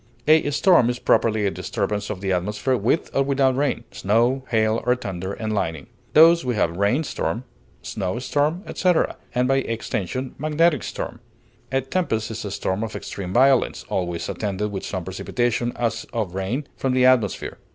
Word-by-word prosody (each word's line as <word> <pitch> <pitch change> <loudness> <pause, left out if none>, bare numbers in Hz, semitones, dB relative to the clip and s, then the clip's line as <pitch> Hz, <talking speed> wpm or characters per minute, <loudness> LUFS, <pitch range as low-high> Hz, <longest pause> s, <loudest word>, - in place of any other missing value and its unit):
A 155 -1 +5
storm 145 -4 +4
is 125 - -1
properly 110 -4 +2
a 100 - +1
disturbance 105 +2 -3
of 95 -3 -5
the 95 -1 -1
atmosphere, 105 +8 0
with 120 +8 0
or 135 - +4
without 135 -1 +2
rain, 135 -4 0
snow, 120 +6 +1
hail, 110 -1 +2
or 125 +1 +3
thunder 95 -5 -5
and 110 0 -3
lightning. 80 -8 -2 0.3
Thus 165 +2 +7
we 125 -2 -1
have 85 -5 +1
rain 100 - +2
storm, 115 - -3 0.4
snow 95 +1 -3
storm, 145 +8 0
etc., 180 -3 +1 0.2
and 125 +1 +2
by 135 +1 +3
extension, 115 0 -3
magnetic 155 +1 +2
storm. 120 - -5 0.5
A 135 0 +2
tempest 130 -6 -1
is 110 +1 -5
a 105 - -4
storm 95 +1 -2
of 110 - -5
extreme 90 -2 -6
violence, 130 +4 +3
always 85 -2 -2
attended 105 0 -2
with 95 - -5
some 95 -3 -4
precipitation, 120 +6 -1
as 115 -1 -2
of 105 -6 -2
rain, 95 +10 -2
from 130 -1 -1
the 130 0 +4
atmosphere. 125 -6 +2
115 Hz, 170 wpm, -23 LUFS, 100-135 Hz, 0.5 s, Thus